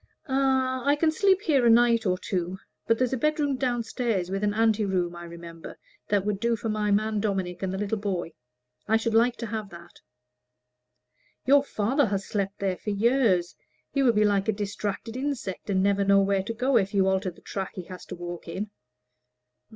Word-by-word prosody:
"Ah, 265 -1 +1
I 285 +1 +3
can 315 +1 +2
sleep 385 +3 +3
here 290 -10 +2
a 235 - +5
night 230 -1 +4
or 185 0 +1
two. 180 0 -3 0.3
But 230 - +3
there's 255 +1 0
a - - +1
bedroom 295 +1 +1
down 245 -2 -1
stairs, 220 -6 -2
with 195 +1 -2
an 205 - +2
ante 220 -1 +3
room, 180 -3 -1
I 175 0 -8
remember, 170 -1 -10 0.3
that 200 -2 +1
would 205 -2 -1
do 235 +1 +1
for 225 +1 -4
my 215 -1 0
man 215 +1 +1
Dominic 190 -4 -2
and 190 -1 -1
the 190 - -3
little 210 +2 -2
boy. 185 -5 -3 0.5
I 220 +1 +4
should 225 0 -2
like 235 +2 +4
to 230 - -4
have 215 -2 -4
that." 170 -2 -14 1.4
"Your 280 +1 +5
father 260 +2 +1
has 195 -1 -2
slept 200 -1 -2
there 190 -2 -1
for - - -6
years. 210 -4 +2 0.4
He 275 - +1
will 250 -3 +4
be 210 0 +3
like 200 -1 +1
a 220 - +2
distracted 205 +2 -4
insect, 260 -9 -4
and 190 -1 +2
never 200 0 +2
know 200 0 +5
where 195 0 +1
to 230 - -3
go, 255 +2 +2
if 200 -1 0
you 190 -1 +3
alter 190 0 +1
the 170 - -14
track 190 -2 -5
he 185 - -5
has 180 +1 -10
to 180 - -6
walk 175 0 -7
in." 200 +5 -5
210 Hz, 205 wpm, -26 LUFS, 190-240 Hz, 1.4 s, a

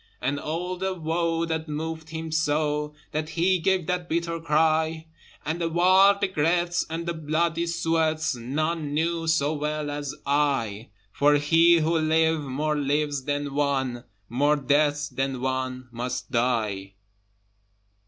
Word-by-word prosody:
And 140 +3 -1
all 175 +5 -3
the 190 +1 -2
woe 165 0 -1
that 160 -1 -3
moved 160 +1 -4
him 160 0 -5
so 150 -1 0 0.2
That 155 +1 -3
he 180 +3 +2
gave 185 0 +1
that 180 0 -2
bitter 170 0 -1
cry, 160 0 +1 0.4
And 160 +3 -2
the 165 - 0
wild 190 +4 +5
regrets, 175 0 +1
and 165 +1 -4
the 170 - -2
bloody 165 +2 -1
sweats, 160 -2 0
None 145 +5 -2
knew 165 +1 0
so 155 -2 +2
well 150 0 -2
as 145 -1 -4
I: 135 -7 0 0.2
For 145 +5 +3
he 165 +3 +5
who 165 +1 +1
live 160 0 +2
more 145 +2 -2
lives 145 -1 -1
than 145 -1 -2
one 135 -4 0 0.2
More 145 +5 +2
deaths 145 +1 +1
than 135 -1 -2
one 130 0 -3
must 125 +2 -4
die. 110 -6 -1
155 Hz, 140 wpm, -25 LUFS, 145-165 Hz, 0.4 s, wild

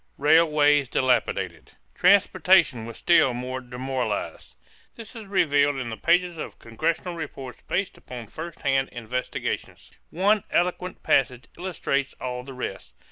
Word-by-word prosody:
=Railways 150 -3 +4
Dilapidated.= 125 -3 0 0.2
Transportation 180 - +4
was 115 - -9
still 135 -7 +4
more 130 +1 -4
demoralized. 130 +1 -4 0.4
This 230 -1 -11
is 220 -3 -9
revealed 145 -7 +2
in 125 -3 -4
the - - -4
pages 175 +3 +1
of - - -7
congressional 160 +9 -2
reports 135 -6 -7
based 190 +1 -2
upon 120 -2 -9
first 160 +9 -9
hand 135 0 +1
investigations. 120 +2 -4 0.2
One 200 +4 +2
eloquent 180 +1 -1
passage 125 -1 +2
illustrates 150 -6 -2
all 125 -1 -4
the 135 0 -10
rest. 95 - -6
140 Hz, 130 wpm, -25 LUFS, 125-175 Hz, 0.4 s, =Railways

